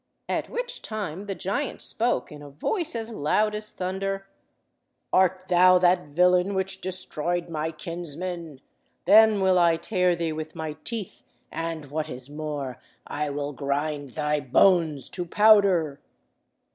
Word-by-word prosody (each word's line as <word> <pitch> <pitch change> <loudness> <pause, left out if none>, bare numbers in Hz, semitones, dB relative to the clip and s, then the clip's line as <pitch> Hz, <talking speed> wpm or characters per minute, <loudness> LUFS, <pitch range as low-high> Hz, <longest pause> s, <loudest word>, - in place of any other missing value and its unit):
At - - -2
which - - -4
time 205 -3 -5
the 195 - -3
giant 225 +11 -3
spoke, 240 +2 -1
in 150 -1 -10
a 145 - -10
voice 320 - -2
as 225 0 -4
loud 210 +4 +1
as 210 0 -3
thunder— 195 +1 -3 0.9
"Art 185 0 +3
thou 185 0 +6
that 180 -2 +3
villain 180 +5 +3
which 190 0 -2
destroyed 175 -2 -3
my 160 -1 -2
kinsmen? 165 -1 -6 0.4
Then 215 -1 +6
will 190 -1 +4
I 170 -1 +4
tear 180 -1 +1
thee 165 -2 -2
with 155 0 -6
my 160 -1 -4
teeth, 225 -5 -5 0.3
and, 165 -3 -5
what 155 +1 -2
is 130 +1 -9
more, 145 -4 -5 0.2
I 150 0 -3
will 145 0 -3
grind 145 0 -2
thy 150 0 +1
bones 155 +1 +3
to 180 - -3
powder." 185 -7 +4
175 Hz, 145 wpm, -26 LUFS, 150-195 Hz, 0.9 s, thou